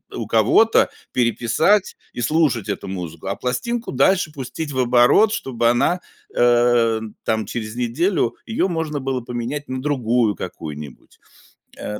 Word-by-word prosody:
у - - -4
кого-то, 225 0 +4 0.2
переписать 120 - +2 0.2
и - - -5
слушать 135 -6 +1
эту 100 -1 -4
музыку, 85 -4 -6
а - - -1
пластинку 225 - -3
дальше 155 +4 +2
пустить 140 +3 -6
в 130 - -3
оборот, 125 - +4
чтобы 120 - 0
она, 150 +9 +2 0.4
э, 120 -2 +3 0.2
там 110 -1 0
через 110 -2 -5
неделю 125 - 0
её 220 -4 0
можно 160 -4 -2
было 130 -1 -2
поменять 125 +5 -5
на 130 0 -4
другую 120 -6 +1
какую-нибудь. 75 -3 -9 0.6
Э, 105 0 -5
125 Hz, 135 wpm, -21 LUFS, 115-150 Hz, 0.6 s, кого-то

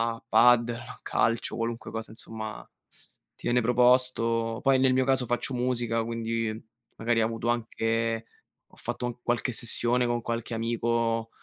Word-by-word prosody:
a 115 - -16
padel 120 -1 +5
o - - -9
a 120 - -11
calcio, 115 0 0
qualunque 115 0 -4
cosa, 110 -1 -5
insomma, 110 -1 -6 0.7
ti - - -7
viene 120 +1 +3
proposto. 120 -2 +2
Poi, 135 -1 +4
nel 130 0 +4
mio 130 0 +3
caso, 130 -1 +2
faccio 120 +3 -1
musica, 120 -2 0
quindi 115 -1 -2 0.5
magari 115 0 +1
ho - - +3
avuto 115 +1 -2
anche 115 -1 -1 0.5
ho - - -20
fatto 120 0 -4
qualche 120 +2 0
sessione 120 +1 +2
con 120 0 -1
qualche 115 0 -4
amico, 115 0 0
115 Hz, 150 wpm, -27 LUFS, 115-120 Hz, 0.7 s, padel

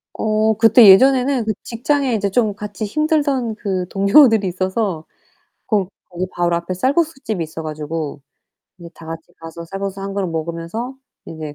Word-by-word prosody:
어 215 0 +1
그때 225 0 +7
예전에는 260 +4 +5
그 215 - 0
직장에 265 +2 -1
이제 205 -2 0
좀 215 +1 +1
같이 205 +1 -6
힘들던 285 -2 0
그 190 -4 -3
동료들이 205 +1 +5
있어서 185 -2 -2 0.6
고 200 -4 0 0.2
거기 180 +1 -4
바로 175 -1 0
앞에 170 +2 -4
쌀국수집이 270 - -1
있어 160 +1 -7
가지고 155 -1 -5 0.6
그래서 170 -2 -12
다 165 - -13
같이 165 0 -9
가서 165 +1 -9
쌀국수 195 +2 -5
1 195 0 -5
그릇 195 -1 -2
먹으면서 170 +9 -5 0.3
이제 155 -2 -8
200 Hz, 330 characters per minute, -19 LUFS, 170-230 Hz, 0.6 s, 그때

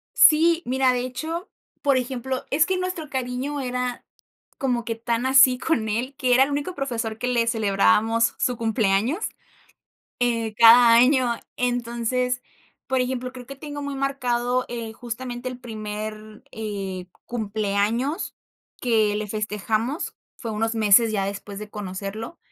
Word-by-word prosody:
Sí, 330 +2 +6
mira, 260 0 +2
de 245 - 0
hecho, 315 +8 -4 0.3
por 275 -3 +3
ejemplo, 255 +1 -3
es 305 +4 +4
que 375 -1 0
nuestro 365 -5 -4
cariño 260 +2 -3
era 250 -1 -3 0.5
como 245 -3 0
que 230 0 -3
tan 235 +2 -2
así 265 -1 +6
con 235 -8 0
él, 245 +6 -2
que 255 -3 +2
era 260 +2 +6
el 285 - -2
único 290 +6 -2
profesor 230 -5 -3
que 250 - -3
le 235 -2 +1
celebrábamos 225 +1 +2
su 245 -2 0
cumpleaños, 225 - +1 1.0
eh, 230 -3 0
cada 235 +1 +8
año. 250 0 +4 0.2
Entonces, 245 +1 -1 0.4
por 260 -1 +1
ejemplo, 255 0 -2
creo 250 -2 -10
que 275 - -9
tengo 290 0 -7
muy 285 -1 -4
marcado, 250 -2 0
eh, 230 -2 -5
justamente, 245 +1 -6
el 250 -1 -7
primer, 215 -2 -7
eh, 195 -4 -5 0.2
cumpleaños 220 - -1 0.5
que 220 -4 +2
le 215 0 -3
festejamos. 215 - -2 0.2
Fue 230 - -5
unos 225 +2 -1
meses 220 +1 +5
ya 195 -2 0
después 200 0 -6
de 210 0 -7
conocerlo. 205 - -6
240 Hz, 145 wpm, -24 LUFS, 220-260 Hz, 1.0 s, cada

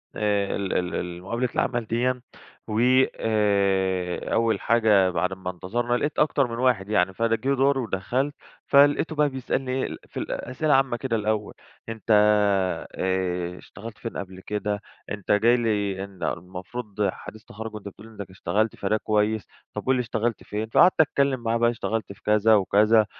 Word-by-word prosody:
ال 100 -2 0
ال 90 0 -1
ال 90 0 -4
مقابلة 115 +5 -1
العمل 120 -2 0
ديَّا، 125 +3 0 0.5
و 110 0 -1 0.4
آآ 95 -4 0
أول 115 -1 +2
حاجة 110 -5 +4
بعد 90 +1 -1
اما 95 -1 -5
انتظرنا، 120 +7 -2
لقيت 150 +3 -2
أكتر 145 -3 +2
من 115 - -5
واحد 120 -6 +1
يعني 95 -3 +2
فجه 115 +5 0
دُوري 135 +1 +2
ودخلت، 125 +6 -1 0.3
فلقيته 145 +3 +4
بقى 150 -1 +3
بيسألني 130 0 -3
إيه 130 0 0
ال - - -7
في - - -5
أسئلة 145 +5 -1
عامّة 135 -3 +2
كده 130 -3 -2
الأول: 105 -1 -1 0.4
"أنت 110 -2 -8 0.9
آآ 90 -1 -1
اشتغلت 110 +3 -11
فين 115 - -6
قبل 95 -1 -7
كده؟ 105 0 -3 0.3
أنت 105 -2 -3
جاي 115 +4 +4
لي 105 -4 -1
إن 100 -2 -10
المفروض 100 +4 -3
حديث 110 0 -11
تخرج 110 0 -8
وأنت 105 -1 -8
بتقول 105 +3 -11
لي 115 - -15
إنك 100 - -6
اشتغلت 100 +4 -1
فده 105 +2 0
كويس، 105 0 0 0.3
طب - - -5
قل 130 - +3
لي 125 - 0
اشتغلت 115 -1 -2
فين؟" 110 +1 -4
فقعدت 175 +8 +5
اتكلم 140 -3 +1
معاه 115 0 +1
بقى 120 0 +3
اشتغلت 115 -2 -3
في 100 - -23
كذا 105 +1 +4
وكذا، 105 +2 +4
110 Hz, 165 wpm, -25 LUFS, 100-120 Hz, 0.9 s, فقعدت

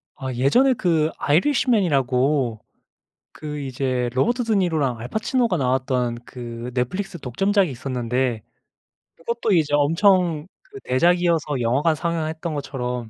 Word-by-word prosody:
아 130 -2 -5
예전에 145 - +3
그 165 -8 +1
아이리시맨이라고 145 - +1 0.7
그 150 -1 -7
이제 130 -2 -2
로버트 240 - +1
드니로랑 165 - 0
알 120 - -6
파치노가 225 - 0
나왔던 125 -3 0
그 120 0 -7
넷플릭스 180 +10 -2
독점작이 190 - +1
있었는데 125 -2 -2 0.7
그것도 230 +6 -2
이제 155 -4 +2
엄청 165 +1 +3
그 405 +2 -13
대작이어서 170 -1 +1
영화관 140 +8 +2
상영했던 160 0 -3
것처럼 125 -5 -4
145 Hz, 305 characters per minute, -22 LUFS, 125-180 Hz, 0.7 s, 예전에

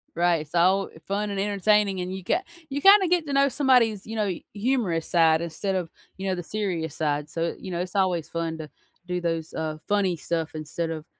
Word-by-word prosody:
Right, 170 -2 +2
it's 155 +3 -9
all, 190 +3 +4
uh, - - -15
fun 205 +1 -1
and 200 -1 -3
entertaining, 200 -1 +2
and 180 +1 -4
you 190 - -7
got 355 - 0 0.3
you 280 +1 -3
kinda 390 -1 +7
get 340 -3 +1
to 280 - -2
know 275 0 +4
somebody's, 245 -7 +3
you 225 - -5
know, 210 -1 +1
y 185 -4 -4
humorous 205 -7 0
side 165 -2 +4
instead 180 +4 -2
of, 175 -3 -2 0.3
you 195 0 -4
know, 185 - +1
the 175 - -5
serious 175 -7 -3
side, 150 -1 -1
so, 165 0 -2
you 190 - -8
know, 175 0 -2
it's 180 +2 -6
always 180 -4 +1
fun 165 -1 -3
to 155 -2 -8 0.4
do 180 0 -2
those, 165 -2 -2
uh, 155 -1 -3
funny 200 -4 +2
stuff 165 0 -3
instead 160 +2 -3
of 160 -1 -5
180 Hz, 225 wpm, -25 LUFS, 165-210 Hz, 0.4 s, kinda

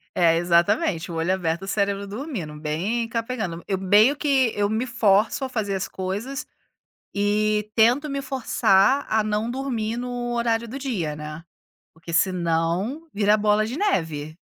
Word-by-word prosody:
É, 165 -2 +4
exatamente, 175 0 +2
o 165 - -5
olho 165 +3 +1
aberto, 170 -1 -2
o - - -7
cérebro 200 0 -1
dormindo, 205 - -5
bem 185 +10 -1
capengando. 225 -8 -3
Eu 190 -1 -1
meio 210 +9 +5
que 270 -5 +2
eu 205 0 +1
me 220 +3 -1
forço 225 0 +2
a 265 - -2
fazer 215 -5 -2
as 190 - -2
coisas 205 +10 -4 0.7
e 210 +1 +1
tento 245 +7 +4
me 275 -1 -3
forçar 260 -2 +2
a 220 0 +3
não 215 +2 -1
dormir 240 -4 -2
no 245 -1 -3
horário 235 -1 0
do 255 +5 -6
dia, 200 - -2
né, 150 +2 -8 0.5
porque 165 +1 -10
senão 175 - 0
vira 205 +1 +3
bola 210 0 +2
de 245 +5 -5
neve. 160 - -1
210 Hz, 155 wpm, -24 LUFS, 180-240 Hz, 0.7 s, meio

